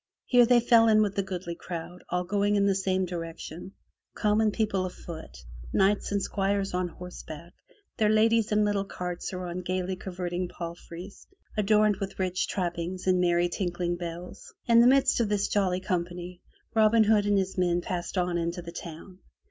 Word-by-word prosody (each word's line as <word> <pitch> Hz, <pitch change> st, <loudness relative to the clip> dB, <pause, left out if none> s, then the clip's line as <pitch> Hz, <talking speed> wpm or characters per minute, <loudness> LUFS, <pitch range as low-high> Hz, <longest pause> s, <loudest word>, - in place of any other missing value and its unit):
Here 245 Hz, -2 st, +5 dB
they 245 Hz, 0 st, +6 dB
fell 230 Hz, -1 st, +5 dB
in 215 Hz, -1 st, +5 dB
with 200 Hz, -1 st, -2 dB
a -, -, +4 dB
goodly 185 Hz, -2 st, -5 dB
crowd, 175 Hz, +1 st, -7 dB
all 180 Hz, 0 st, 0 dB
going 205 Hz, +2 st, +1 dB
in 200 Hz, -1 st, +3 dB
the 200 Hz, -, +3 dB
same 190 Hz, -1 st, 0 dB
direction, 170 Hz, +1 st, -7 dB, 0.4 s
common 215 Hz, +1 st, +2 dB
people 210 Hz, -3 st, 0 dB
afoot, 170 Hz, -3 st, -9 dB, 0.4 s
knights 200 Hz, +2 st, +2 dB
and 200 Hz, -, +1 dB
squires 195 Hz, 0 st, -1 dB
on 180 Hz, 0 st, 0 dB
horseback, 170 Hz, -1 st, -10 dB, 0.4 s
their 215 Hz, -2 st, +3 dB
ladies 220 Hz, 0 st, +3 dB
in 210 Hz, 0 st, +3 dB
little 205 Hz, -1 st, +1 dB
carts 180 Hz, -2 st, -5 dB
or 185 Hz, -1 st, -5 dB
on 175 Hz, +1 st, -4 dB
gaily 185 Hz, +1 st, -2 dB
curvetting 180 Hz, -1 st, -4 dB
palfries 175 Hz, +2 st, -9 dB, 0.3 s
adorned 210 Hz, -1 st, +3 dB
with 195 Hz, -1 st, -5 dB
rich 185 Hz, -1 st, -1 dB
trappings 175 Hz, 0 st, -3 dB
and 185 Hz, -1 st, +3 dB
merry 175 Hz, 0 st, +3 dB
tinkling 175 Hz, -1 st, -2 dB
bells. 175 Hz, 0 st, -8 dB
In 235 Hz, -1 st, +5 dB
the 235 Hz, -, +7 dB
midst 270 Hz, 0 st, +4 dB
of 225 Hz, -3 st, +1 dB
this 205 Hz, -1 st, +1 dB
jolly 185 Hz, -3 st, +1 dB
company, 175 Hz, -1 st, -3 dB, 0.3 s
Robin 220 Hz, 0 st, +5 dB
Hood 210 Hz, -1 st, +3 dB
and 205 Hz, -1 st, +3 dB
his 190 Hz, -1 st, -1 dB
men 175 Hz, -1 st, +1 dB
passed 175 Hz, +1 st, -4 dB
on 180 Hz, -1 st, +1 dB
into 170 Hz, +1 st, -3 dB
the 170 Hz, -, -7 dB
town. 175 Hz, +2 st, -9 dB
185 Hz, 175 wpm, -28 LUFS, 175-205 Hz, 0.4 s, the